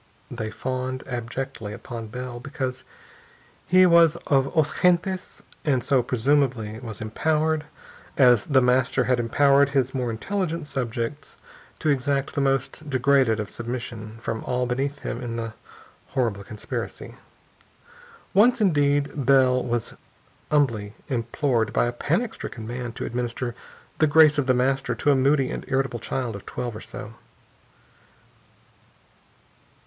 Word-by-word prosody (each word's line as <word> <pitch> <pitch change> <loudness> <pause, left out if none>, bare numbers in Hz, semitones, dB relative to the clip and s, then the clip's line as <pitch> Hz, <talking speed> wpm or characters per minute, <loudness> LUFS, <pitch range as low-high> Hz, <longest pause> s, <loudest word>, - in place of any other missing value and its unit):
They 110 -3 -4
fawned 130 +3 -4
abjectly 120 -2 -5
upon 115 +1 -7
Bell, 125 +2 -6
because 130 -1 -4 0.8
he 185 +2 +6
was 170 -2 +6
of 135 -2 +3
os 155 -2 +1
gentes 180 +1 +1 0.2
and 130 -5 +1
so 135 -3 +3
presumably 125 -3 0
was 115 -4 -7
empowered, 155 +7 0 0.5
as 125 -5 +5
The 135 -3 +3
Master 125 +1 +2
had 125 0 +1
empowered 140 +4 +4
his 135 -2 +1
more 125 -3 -1
intelligent 165 - -2
subjects, 130 +1 -4 0.4
to 155 - -1
exact 140 0 0
the 140 - 0
most 135 +2 -1
degraded 130 -4 +3
of 105 - -4
submission 115 -2 -6
from 110 -1 -4
all 125 0 0
beneath 135 +4 -2
him 120 - -4
in 120 -2 -4
the 115 -1 -4 0.6
horrible 110 -6 0
conspiracy. 105 +1 -6 1.2
Once, 240 +6 +5
indeed, 145 - +1
Bell 130 -2 +5
was 120 -2 -2 0.6
humbly 115 -8 +1
implored 120 -1 0
by - - +3
a 120 - -1
panic 175 - -1
stricken 110 - -7
man 120 +1 -4
to - - -5
administer 120 0 -3 0.5
"the 155 - +5
grace 150 0 +6
of 135 - 0
The 130 - +4
Master" 130 0 +1
to 145 - +2
a - - +4
moody 135 0 +2
and - - -4
irritable 135 -3 0
child 125 -3 -3
of 100 - -10
twelve 120 -3 -4
or 110 - -7
so. 105 - -8
130 Hz, 135 wpm, -24 LUFS, 120-145 Hz, 1.2 s, he